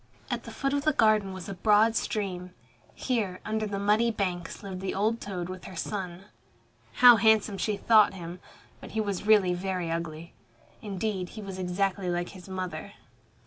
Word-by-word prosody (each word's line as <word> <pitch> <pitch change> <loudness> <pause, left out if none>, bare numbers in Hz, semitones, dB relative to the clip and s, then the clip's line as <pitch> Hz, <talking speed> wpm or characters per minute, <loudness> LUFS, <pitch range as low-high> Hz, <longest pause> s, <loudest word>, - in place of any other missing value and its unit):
At - - -3
the - - -8
foot 275 -1 -2
of 285 0 0
the 310 0 +3
garden 215 -5 +3
was 185 -2 -7
a 200 - -4
broad 215 +4 +4
stream. 185 -5 -3 0.4
Here, 210 -8 -1
under 215 0 -1
the 200 -1 -3
muddy 210 +4 +3
banks 185 -6 -3
lived 190 -2 -6
the 190 - -3
old 220 +4 0
toad 180 -4 -4
with 185 0 -8
her 190 - -9
son. 185 0 -4 0.7
How 245 -2 +8
handsome 220 -2 +3
she 210 -2 0
thought 215 -3 +5
him! 175 0 -7 0.4
But - - -11
he 220 - -1
was 205 -1 -2
really 200 -5 +5
very 180 -2 -2
ugly. 165 0 -5 0.5
Indeed, 195 -3 -3
he 215 - -9
was 190 -1 -7
exactly 185 +1 -1
like 175 0 -1
his 190 -1 -12
mother. 185 -1 -5
195 Hz, 180 wpm, -28 LUFS, 180-215 Hz, 0.7 s, How